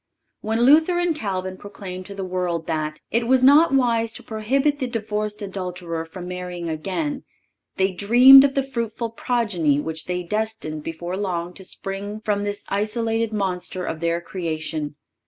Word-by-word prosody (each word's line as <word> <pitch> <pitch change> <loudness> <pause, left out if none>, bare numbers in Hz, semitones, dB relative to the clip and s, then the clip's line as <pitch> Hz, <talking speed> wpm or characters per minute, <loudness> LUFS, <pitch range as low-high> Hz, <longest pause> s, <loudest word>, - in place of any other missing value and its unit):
When 220 +2 -1
Luther 315 +7 +5
and 350 -2 +1
Calvin 190 -6 -3
proclaimed 190 -2 -8
to 200 - -8
the 195 - -4
world 180 -3 -2
that 155 -1 -3
"it 230 +1 +1
was 260 0 +4
not 290 +5 +7
wise 235 -4 +2
to - - -10
prohibit 270 +7 0
the 260 - -1
divorced 210 -3 -3
adulterer 180 -4 -4
from 175 +2 -9
marrying 180 -1 -5
again,"(545) 230 - -3 0.5
they 190 - 0
little 195 +2 -5
dreamed 260 +4 +10
of 275 -1 +1
the 275 - +2
fruitful 235 -3 -3
progeny 210 - +1
which 160 +1 -4
was 180 0 -2
destined 210 -7 -2
before 175 +4 -5
long 180 -3 -2
to 190 - -12
spring 195 +3 -5
from 210 -2 -1
this 205 0 -3
isolated 225 +2 0
monster 185 -3 -2
of 160 - -4
their 170 +1 0
creation. 155 -4 -3
200 Hz, 165 wpm, -23 LUFS, 180-230 Hz, 0.5 s, dreamed